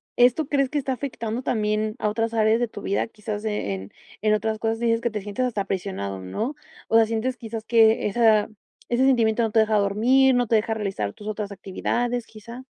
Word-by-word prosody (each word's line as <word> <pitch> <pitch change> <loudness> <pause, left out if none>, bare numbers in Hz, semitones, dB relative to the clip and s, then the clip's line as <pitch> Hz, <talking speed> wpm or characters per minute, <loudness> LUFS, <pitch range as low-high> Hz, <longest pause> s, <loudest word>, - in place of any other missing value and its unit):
¿esto 250 +5 +4
crees 275 -2 +1
que 295 - -1
está 265 -1 -2
afectando 245 -3 -4
también 215 -1 0
a 210 - +1
otras 225 +1 -1
áreas 220 +1 +3
de 240 - 0
tu 205 - -9
vida?, 200 - 0
quizás, 210 -1 -6
eh, 100 - -3 0.3
en 215 0 +3
otras 220 +1 0
cosas 225 +1 -1
dices 230 -1 +2
que 235 - -1
te 210 -2 -4
sientes 205 +5 -2
hasta 205 -5 -2
presionado, 180 - -4
¿no?, 220 - -3 0.3
o 225 - 0
sea, 225 -1 +7
¿sientes 230 +3 -2
quizás 225 -1 -6
que 225 -2 +4
esa 215 0 +3 0.4
ese 245 +2 +2
sentimiento 235 -3 +3
no 220 - 0
te 225 - +3
deja 215 -1 +3
dormir, 245 +7 +4
no 245 -1 +1
te 225 - +2
deja 220 +1 +1
realizar 195 - -3
tus 210 - -11
otras 210 -1 -4
actividades, 240 +5 -2
quizá? 235 +4 -11
220 Hz, 205 wpm, -24 LUFS, 210-240 Hz, 0.4 s, sea